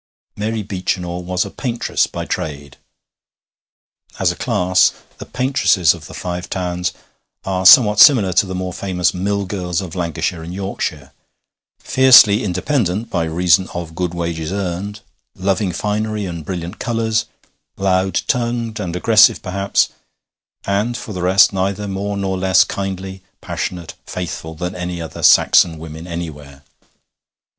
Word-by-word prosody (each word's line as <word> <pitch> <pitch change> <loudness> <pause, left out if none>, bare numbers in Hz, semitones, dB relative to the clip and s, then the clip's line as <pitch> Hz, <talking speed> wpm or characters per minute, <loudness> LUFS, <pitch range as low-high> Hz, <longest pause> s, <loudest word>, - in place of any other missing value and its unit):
Mary 110 +1 -3
Beechinor 90 -2 -3
was 90 0 -1
a - - -8
paintress 120 -3 -1
by - - -6
trade. 70 -2 -5 1.4
As - - +2
a - - -7
class 90 +1 +2 0.3
the - - -9
paintresses 125 - +2
of - - -11
the - - -11
Five 90 0 -5
Towns 90 -1 -2 0.5
are 95 -1 +2
somewhat 105 -3 +7
similar 110 - +6
to 100 - +3
the 95 - -5
more 90 -1 -4
famous 90 -3 -1
mill 100 +2 -1
girls 90 -3 -3
of 90 -4 -6
Lancashire 85 -1 -3
and 85 +2 -7
Yorkshire 95 0 -4 0.7
fiercely 125 -6 +6
independent 105 - -1
by 85 -2 0
reason 90 +2 +2
of 85 -2 -5
good 90 0 -3
wages 85 -1 -3
earned, 100 +2 -4 0.3
loving 95 0 -1
finery 105 +3 -2
and 85 -4 -6
brilliant 90 +2 -6
colours, 115 -1 -1 0.5
loud 95 -1 +1
tongued 120 -3 -2
and 90 -4 -4
aggressive, 110 +4 +4
perhaps, 100 +1 0 0.8
and 105 +5 -1
for 110 - -7
the 90 - -5
rest 95 +3 +5
neither 100 +2 -2
more 100 +1 -3
nor 95 -1 -2
less 95 0 +4
kindly, 95 -1 -5 0.2
passionate, 85 -3 -5
faithful, 80 -2 -6
than 90 +3 -4
any 90 0 -5
other 80 -3 -7
Saxon 80 -2 +5
women 80 +1 -9
anywhere. 75 -5 -7
95 Hz, 140 wpm, -18 LUFS, 90-100 Hz, 1.4 s, somewhat